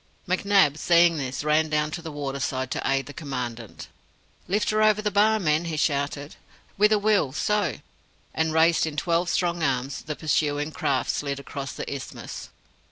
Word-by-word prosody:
McNab, 185 Hz, -5 st, +3 dB
seeing 170 Hz, -1 st, +4 dB
this, 130 Hz, -1 st, -4 dB
ran 155 Hz, +1 st, +2 dB
down 150 Hz, 0 st, 0 dB
to 175 Hz, +2 st, -5 dB
the 160 Hz, -1 st, -7 dB
water 140 Hz, -2 st, -4 dB
side 130 Hz, 0 st, -2 dB
to -, -, -2 dB
aid 135 Hz, 0 st, 0 dB
the 145 Hz, -, -10 dB
Commandant. 125 Hz, -, -6 dB, 0.6 s
"Lift 210 Hz, +4 st, +1 dB
her 215 Hz, 0 st, +1 dB
over 215 Hz, -1 st, +4 dB
the 210 Hz, 0 st, -1 dB
Bar, 215 Hz, +2 st, +3 dB
men!" 155 Hz, -2 st, +1 dB
he 160 Hz, -2 st, -3 dB
shouted. 145 Hz, -1 st, -1 dB, 0.4 s
"With 210 Hz, +2 st, +4 dB
a 215 Hz, -, +5 dB
will 205 Hz, -10 st, +2 dB
So!" 210 Hz, +6 st, 0 dB, 0.6 s
And, 160 Hz, 0 st, 0 dB
raised 160 Hz, +1 st, +3 dB
in 150 Hz, -1 st, -6 dB
twelve 170 Hz, +1 st, +1 dB
strong 175 Hz, -1 st, 0 dB
arms, 135 Hz, -2 st, -1 dB
the 150 Hz, 0 st, -5 dB
pursuing 150 Hz, 0 st, 0 dB
craft 140 Hz, -3 st, 0 dB
slid 140 Hz, -1 st, -3 dB
across 140 Hz, 0 st, -6 dB
the -, -, -5 dB
isthmus. 140 Hz, -1 st, -7 dB
155 Hz, 175 wpm, -25 LUFS, 140-175 Hz, 0.6 s, a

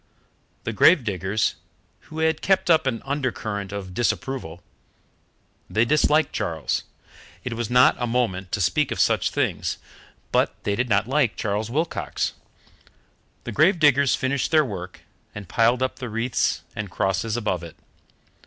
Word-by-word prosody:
The -, -, -3 dB
grave 170 Hz, -8 st, +5 dB
diggers, 100 Hz, 0 st, -1 dB, 0.5 s
who 155 Hz, -, -9 dB
had 160 Hz, -1 st, +1 dB
kept 190 Hz, -2 st, +2 dB
up 160 Hz, -3 st, +4 dB
an 115 Hz, -3 st, -2 dB
undercurrent 115 Hz, -8 st, -3 dB
of 100 Hz, -3 st, -6 dB
disapproval 115 Hz, -6 st, -2 dB, 1.1 s
they 110 Hz, +2 st, +2 dB
disliked 150 Hz, +2 st, +2 dB
Charles; 85 Hz, -8 st, -2 dB, 0.6 s
it 125 Hz, -, -3 dB
was 115 Hz, -1 st, -3 dB
not 125 Hz, +1 st, +5 dB
a 120 Hz, -, 0 dB
moment 105 Hz, -7 st, -1 dB
to 105 Hz, -, 0 dB
speak 150 Hz, +10 st, +1 dB
of -, -, -4 dB
such -, -, +2 dB
things, -, -, -1 dB, 0.5 s
but -, -, +2 dB
they 100 Hz, -, 0 dB
did 125 Hz, +3 st, -1 dB
not 105 Hz, 0 st, +2 dB
like 135 Hz, -4 st, +1 dB
Charles 105 Hz, +1 st, -2 dB
Wilcox 125 Hz, -, -2 dB, 1.1 s
the -, -, -5 dB
grave 175 Hz, +5 st, +4 dB
diggers 140 Hz, -4 st, +4 dB
finished 130 Hz, +1 st, -1 dB
their 155 Hz, -2 st, +4 dB
work 90 Hz, -6 st, -7 dB, 0.3 s
and 105 Hz, -3 st, -7 dB
piled 120 Hz, +7 st, +2 dB
up 130 Hz, -, -2 dB
the 125 Hz, -3 st, -6 dB
wreaths 115 Hz, +3 st, -1 dB
and 105 Hz, -2 st, -4 dB
crosses 95 Hz, +5 st, -1 dB
above 105 Hz, -7 st, -1 dB
it. 85 Hz, 0 st, -10 dB
115 Hz, 150 wpm, -24 LUFS, 100-140 Hz, 1.1 s, grave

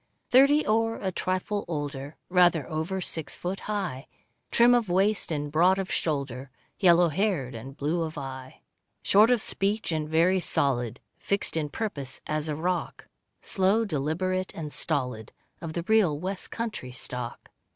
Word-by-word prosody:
Thirty 280 Hz, +4 st, +6 dB
or 225 Hz, +1 st, +2 dB
a 190 Hz, -, -3 dB
trifle 185 Hz, +3 st, -2 dB
older, 145 Hz, -2 st, -4 dB
Rather 175 Hz, -6 st, +4 dB
over 160 Hz, +5 st, -2 dB
six 160 Hz, -3 st, -4 dB
foot 185 Hz, +2 st, -4 dB
high, 190 Hz, -11 st, -3 dB, 0.4 s
Trim 240 Hz, +1 st, +5 dB
of 235 Hz, -5 st, +2 dB
waist 195 Hz, +1 st, +1 dB
and 145 Hz, -2 st, -2 dB
broad 180 Hz, +5 st, +4 dB
of 190 Hz, -1 st, -3 dB
shoulder, 140 Hz, -4 st, -2 dB, 0.3 s
Yellow 175 Hz, -2 st, +5 dB
haired 160 Hz, -, 0 dB
and 130 Hz, +4 st, -9 dB
blue 155 Hz, +4 st, 0 dB
of 160 Hz, -1 st, -4 dB
eye; 130 Hz, -1 st, -7 dB, 0.4 s
Short 210 Hz, +3 st, +6 dB
of 245 Hz, -3 st, +3 dB
speech 205 Hz, 0 st, -1 dB
and 155 Hz, -1 st, -2 dB
very 170 Hz, +4 st, +3 dB
solid, 125 Hz, -7 st, 0 dB, 0.2 s
Fixed 200 Hz, -3 st, -1 dB
in 155 Hz, -2 st, -1 dB
purpose 145 Hz, -, -4 dB
as 155 Hz, 0 st, -2 dB
a 150 Hz, -, -1 dB
rock, 175 Hz, +3 st, -3 dB, 0.3 s
Slow, 200 Hz, +4 st, +2 dB
deliberate, 185 Hz, +4 st, -1 dB
and 150 Hz, -3 st, -6 dB
stolid, 125 Hz, -8 st, -2 dB, 0.3 s
Of 165 Hz, -2 st, -5 dB
the 170 Hz, -, -3 dB
real 195 Hz, -7 st, +3 dB
West 185 Hz, +4 st, -5 dB
country 225 Hz, -, -4 dB
stock. 125 Hz, -1 st, -7 dB
170 Hz, 150 wpm, -27 LUFS, 145-195 Hz, 0.4 s, Thirty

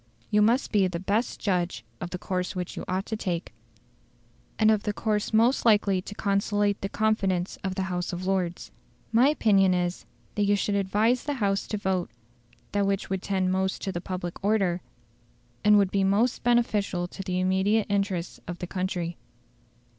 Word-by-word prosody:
You 210 Hz, -, +4 dB
must 235 Hz, +5 st, +2 dB
be 200 Hz, -3 st, +3 dB
the 175 Hz, -2 st, -4 dB
best 205 Hz, +6 st, -1 dB
judge 175 Hz, -, -1 dB
of 175 Hz, -, -5 dB
the 180 Hz, -, -4 dB
course 180 Hz, +1 st, -3 dB
which 180 Hz, -1 st, -4 dB
you -, -, -5 dB
ought 185 Hz, +2 st, -1 dB
to 220 Hz, -, -3 dB
take, 180 Hz, -, -3 dB, 1.0 s
and 220 Hz, 0 st, +5 dB
of 215 Hz, -2 st, +2 dB
the 210 Hz, -1 st, -2 dB
course 210 Hz, -1 st, -1 dB
most 230 Hz, +4 st, +3 dB
likely 205 Hz, -4 st, +4 dB
to 205 Hz, -, -9 dB
conciliate 205 Hz, 0 st, 0 dB
the 195 Hz, -, -2 dB
confidence 195 Hz, -5 st, 0 dB
of 190 Hz, -1 st, -2 dB
the 190 Hz, -, -1 dB
House 180 Hz, -1 st, -2 dB
of 180 Hz, +1 st, -5 dB
Lords. 185 Hz, -3 st, -1 dB, 0.4 s
My 235 Hz, +4 st, +5 dB
opinion 195 Hz, -10 st, +3 dB
is, 175 Hz, 0 st, -2 dB, 0.3 s
that 205 Hz, -, +1 dB
you 205 Hz, +1 st, +3 dB
should 205 Hz, +1 st, -1 dB
advise 210 Hz, +5 st, +1 dB
the 290 Hz, -1 st, -1 dB
House 200 Hz, -5 st, 0 dB
to 210 Hz, -, -2 dB
vote 190 Hz, -3 st, -1 dB, 0.6 s
that 200 Hz, -1 st, +1 dB
which 195 Hz, -1 st, -1 dB
would 190 Hz, -1 st, -1 dB
tend 190 Hz, -2 st, 0 dB
most 190 Hz, 0 st, -1 dB
to 185 Hz, -3 st, -3 dB
public 180 Hz, -1 st, -5 dB
order, 195 Hz, -4 st, +1 dB, 0.8 s
and 210 Hz, 0 st, +6 dB
would 195 Hz, -2 st, +3 dB
be 195 Hz, -1 st, +2 dB
most 210 Hz, +6 st, +2 dB
beneficial 210 Hz, -7 st, +1 dB
to 195 Hz, -, -8 dB
the 185 Hz, -1 st, -2 dB
immediate 190 Hz, +4 st, +2 dB
interests 195 Hz, -4 st, -1 dB
of 175 Hz, -, -5 dB
the 180 Hz, -, -5 dB
country." 180 Hz, -2 st, -3 dB
195 Hz, 180 wpm, -27 LUFS, 185-210 Hz, 1.0 s, and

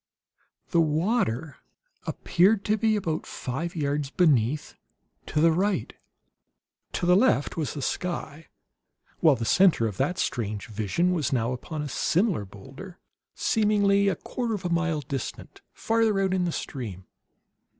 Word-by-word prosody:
The 170 Hz, -, +4 dB
water 160 Hz, -, 0 dB, 0.5 s
appeared 195 Hz, +3 st, +2 dB
to 215 Hz, -, +2 dB
be 220 Hz, 0 st, +2 dB
about 170 Hz, -7 st, -2 dB
five 155 Hz, +7 st, -4 dB
yards 145 Hz, -2 st, -1 dB
beneath, 145 Hz, -, +2 dB, 0.5 s
to 150 Hz, -, -1 dB
the 165 Hz, +1 st, +5 dB
right. 185 Hz, -, 0 dB, 1.0 s
To -, -, -1 dB
the 180 Hz, +1 st, +5 dB
left 200 Hz, -, +2 dB
was 155 Hz, -4 st, -3 dB
the 140 Hz, -, -4 dB
sky, 165 Hz, -2 st, -4 dB, 0.7 s
while 155 Hz, -4 st, +5 dB
the 115 Hz, -2 st, -4 dB
center 180 Hz, -, +4 dB
of 105 Hz, -4 st, -3 dB
that 150 Hz, +7 st, 0 dB
strange 105 Hz, -3 st, -2 dB
vision 115 Hz, -, 0 dB
was 155 Hz, -6 st, -1 dB
now 120 Hz, -2 st, 0 dB
upon 150 Hz, +4 st, -5 dB
a -, -, -4 dB
similar 170 Hz, -, +1 dB
boulder 135 Hz, -, -11 dB, 0.4 s
seemingly 205 Hz, -2 st, +2 dB
a 195 Hz, -, +2 dB
quarter 235 Hz, -3 st, -3 dB
of 190 Hz, -2 st, -7 dB
a -, -, 0 dB
mile 170 Hz, -3 st, 0 dB
distant, 135 Hz, -2 st, -6 dB
farther 225 Hz, -3 st, +1 dB
out 190 Hz, -1 st, +1 dB
in 185 Hz, -1 st, +1 dB
the 170 Hz, -, -1 dB
stream. 105 Hz, -, -6 dB
165 Hz, 145 wpm, -26 LUFS, 135-195 Hz, 1.0 s, the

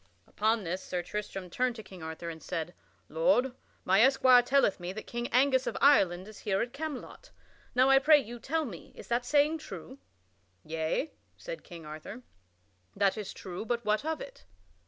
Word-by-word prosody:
Upon 220 Hz, +1 st, 0 dB
this 180 Hz, +2 st, -3 dB
Sir 180 Hz, -1 st, -3 dB
Tristram 195 Hz, -3 st, -5 dB
turned 250 Hz, +2 st, 0 dB
to 220 Hz, -, -8 dB
King 190 Hz, -3 st, -12 dB
Arthur 160 Hz, +1 st, -6 dB
and 160 Hz, -1 st, -10 dB
said: 175 Hz, 0 st, -4 dB, 0.3 s
"Lord, 265 Hz, -, +2 dB, 0.3 s
my 190 Hz, +3 st, +5 dB
esquire 255 Hz, -1 st, +6 dB
telleth 260 Hz, -5 st, +2 dB
me 175 Hz, +1 st, -4 dB
that 215 Hz, -, -7 dB
King 240 Hz, 0 st, -4 dB
Angus 260 Hz, +1 st, +3 dB
of -, -, -2 dB
Ireland 190 Hz, -10 st, +4 dB
is 215 Hz, -, -11 dB
here 195 Hz, -2 st, 0 dB
at 240 Hz, -, -7 dB
Camelot; 295 Hz, -2 st, -6 dB, 0.5 s
now 255 Hz, +1 st, +5 dB
I 270 Hz, 0 st, +7 dB
pray 300 Hz, +2 st, +7 dB
you 240 Hz, -3 st, -5 dB
tell 320 Hz, +5 st, -1 dB
me, 185 Hz, -, -9 dB
is -, -, -11 dB
that 240 Hz, +1 st, 0 dB
saying 300 Hz, +3 st, +3 dB
true?" 280 Hz, -3 st, -9 dB, 0.7 s
"Yea," 160 Hz, -, -2 dB, 0.3 s
said -, -, -7 dB
King 170 Hz, -3 st, -11 dB
Arthur, 155 Hz, +11 st, -8 dB, 0.7 s
"that 200 Hz, -1 st, +2 dB
is 210 Hz, -3 st, -5 dB
true; 185 Hz, +1 st, -7 dB
but 235 Hz, +1 st, -2 dB
what 215 Hz, +3 st, +1 dB
of 320 Hz, +1 st, -2 dB
it?" -, -, -11 dB
235 Hz, 180 wpm, -30 LUFS, 185-270 Hz, 0.7 s, I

